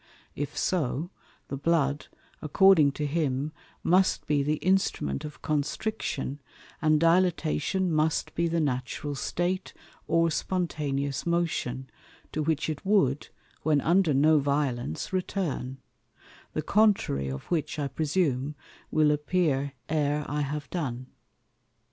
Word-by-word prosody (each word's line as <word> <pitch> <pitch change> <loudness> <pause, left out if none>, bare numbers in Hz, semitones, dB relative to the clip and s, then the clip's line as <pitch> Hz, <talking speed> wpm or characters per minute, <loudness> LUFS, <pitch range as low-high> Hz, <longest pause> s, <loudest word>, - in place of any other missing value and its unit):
If 145 0 -4
so, 165 0 -1 0.4
the 140 - -3
Blood, 145 -1 +1 0.3
according 155 -1 +5
to 150 - -3
him, 145 -1 -1 0.3
must 185 +2 +3
be 150 -1 +2
the 150 +2 +1
Instrument 180 - 0
of 150 - -9
Constriction; 145 -2 -2 0.4
and 155 -1 +4
Dilatation 175 +1 +2
must 155 +1 +1
be 170 0 +1
the 165 0 0
Natural 140 0 -2
State, 175 +6 -2 0.3
or 165 0 +3
Spontaneous 145 -6 -2
Motion, 155 -7 -1 0.4
to 155 - -2
which 155 -1 0
it 155 -2 -4
wou'd, 155 -9 +2 0.3
when 155 -2 +3
under 170 0 +3
no 155 +3 +5
violence, 140 - -1
return; 175 -8 -2 0.8
the 155 - -2
contrary 200 - +2
of 65 0 -5
which, 160 -2 -1
I 145 -2 -1
presume, 145 -1 0 0.3
will 155 -1 +3
appear 150 -3 0
e're 150 -1 0
I 150 +1 -1
have 145 0 -3
done. 130 -8 -3
150 Hz, 120 wpm, -28 LUFS, 140-170 Hz, 0.8 s, according